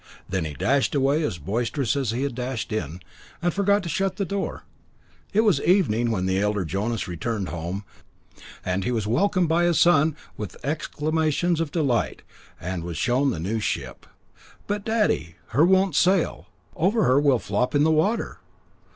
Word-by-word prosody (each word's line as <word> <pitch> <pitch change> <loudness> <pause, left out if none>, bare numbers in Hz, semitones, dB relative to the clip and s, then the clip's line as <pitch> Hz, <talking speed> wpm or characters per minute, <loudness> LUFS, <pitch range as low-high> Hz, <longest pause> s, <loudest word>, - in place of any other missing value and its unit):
Then 95 -3 -1
he 75 -2 -5
dashed 135 - +1
away 140 +3 +2
as 145 - -2
boisterous 115 - -1
as 135 -5 -1
he 120 +4 -1
had 140 -2 -2
dashed 125 -2 -4
in, 90 -4 -4 0.4
and 175 0 0
forgot 200 0 +2
to - - -5
shut 190 +3 0
the 200 - -1
door. 195 +2 -3 0.7
It 215 - +4
was 200 -11 +3
evening 120 - +2
when 95 -5 -1
the 95 0 +1
elder 105 -2 0
Jonas 105 +7 -2
returned 95 +3 -3
home, 85 +4 -4 0.8
and 90 +1 -1
he - - -1
was 115 -4 -1
welcomed 180 - +2
by 170 +2 +2
his 175 -2 +2
son 160 -3 +4 0.2
with 105 -3 -7
exclamations 155 +2 0
of 165 - -1
delight, 140 -8 0 0.4
and 90 -1 -4
was 85 -1 -5
shown 130 +3 +2
the 85 - -2
new 105 +7 -2
ship. - - -4 0.6
"But, 205 0 -2
daddy, 210 - 0
her 145 +8 +4
won't 190 -1 +3
sail; 180 +3 +2 0.3
over 205 +7 +2
her 130 +3 +4
will 140 -3 +4
flop 115 +5 -1
in 145 - +4
the 160 - +4
water." 190 +9 0
135 Hz, 175 wpm, -24 LUFS, 105-175 Hz, 0.8 s, It